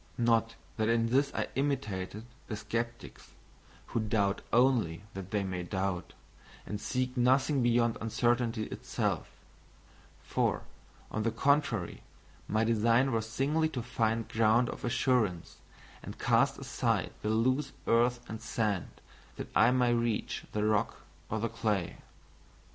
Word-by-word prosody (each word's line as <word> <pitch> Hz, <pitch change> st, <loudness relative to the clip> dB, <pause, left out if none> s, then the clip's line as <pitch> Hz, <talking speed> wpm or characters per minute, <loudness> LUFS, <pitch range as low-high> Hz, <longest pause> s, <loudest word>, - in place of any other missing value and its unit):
Not 115 Hz, -1 st, +2 dB, 0.2 s
that 110 Hz, 0 st, +1 dB
in 115 Hz, 0 st, +2 dB
this 140 Hz, +3 st, +2 dB
I -, -, -1 dB
imitated 110 Hz, -7 st, -2 dB, 0.2 s
the 110 Hz, -, -3 dB
sceptics 115 Hz, +3 st, -5 dB, 0.5 s
who -, -, -2 dB
doubt 105 Hz, -2 st, +1 dB
only 115 Hz, -8 st, +3 dB
that 95 Hz, -1 st, -7 dB
they 105 Hz, -1 st, 0 dB
may 95 Hz, -2 st, -3 dB
doubt, 95 Hz, 0 st, -3 dB, 0.5 s
and 105 Hz, 0 st, -5 dB
seek 125 Hz, +2 st, -1 dB
nothing 130 Hz, +3 st, +3 dB
beyond 120 Hz, -1 st, +2 dB
uncertainty 115 Hz, 0 st, +1 dB
itself; -, -, -2 dB, 0.9 s
for, -, -, 0 dB, 0.5 s
on 110 Hz, -, -1 dB
the 115 Hz, -, +1 dB
contrary, 140 Hz, -, +1 dB, 0.5 s
my 110 Hz, +1 st, +1 dB
design 115 Hz, +4 st, +3 dB
was 110 Hz, -1 st, -1 dB
singly 150 Hz, +7 st, +1 dB
to 125 Hz, -6 st, -4 dB
find 115 Hz, -2 st, 0 dB
ground 115 Hz, +1 st, +3 dB
of -, -, -9 dB
assurance, 115 Hz, -8 st, 0 dB, 0.4 s
and -, -, -8 dB
cast -, -, +3 dB
aside -, -, -1 dB
the 105 Hz, -, -1 dB
loose 130 Hz, +5 st, +1 dB
earth 120 Hz, +1 st, +2 dB
and 110 Hz, 0 st, -6 dB
sand, 105 Hz, -6 st, -2 dB, 0.3 s
that -, -, -6 dB
I 115 Hz, -, +6 dB
might 125 Hz, -1 st, +3 dB
reach 120 Hz, -2 st, 0 dB
the 105 Hz, -, -1 dB
rock 105 Hz, -1 st, +1 dB, 0.3 s
or 110 Hz, -, -1 dB
the 115 Hz, -, 0 dB
clay. 105 Hz, -7 st, -1 dB
115 Hz, 135 wpm, -31 LUFS, 105-125 Hz, 0.9 s, I